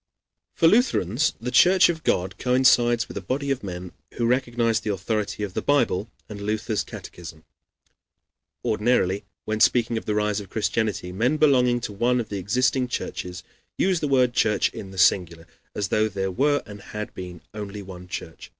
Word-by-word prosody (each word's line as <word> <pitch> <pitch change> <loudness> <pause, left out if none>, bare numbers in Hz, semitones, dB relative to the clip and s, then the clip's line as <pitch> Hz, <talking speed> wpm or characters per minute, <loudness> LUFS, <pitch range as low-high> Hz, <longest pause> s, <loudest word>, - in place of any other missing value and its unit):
] - - -60
For 165 - +4
Lutherans 155 - +2
the 125 - -4
Church 185 +6 +6
of 165 -2 -2
God 90 +1 0
coincides 125 -2 +3
with - - -8
a - - -3
body 140 +1 -2
of 135 - -2
men 90 -2 -6 0.2
who 120 - 0
recognize 120 -2 +1
the 110 - -3
authority 105 +1 -2
of 100 -3 -4
the - - -2
Bible 115 -8 +1 0.2
and 105 -1 -8
Luther's 105 +1 -1
catechism. 80 -2 -10 1.2
Ordinarily, 105 -3 +1 0.2
when 110 0 -2
speaking 115 -1 +3
of - - -16
the 105 - -1
rise 105 0 0
of 100 -3 -9
Christianity, 105 -3 -1
men 120 +11 +1
belonging 125 -5 +3
to 105 - -5
one 125 +5 +1
of 115 - -4
the 100 - -3
existing 125 +6 +1
churches 90 -7 -5 0.3
use 185 -2 +2
the 150 - -1
word 130 -3 +3
church 105 -4 +2
in 95 - -8
the 95 - -11
singular, 90 -4 +2 0.3
as 100 -2 -2
though 110 0 +2
there 95 -1 -2
were 145 +9 +1
and 105 -1 -10
had 105 +1 -7
been 90 -2 -8
only 105 -1 -6
one 90 -1 -10
church. 80 -2 -7
110 Hz, 180 wpm, -24 LUFS, 95-125 Hz, 1.2 s, Church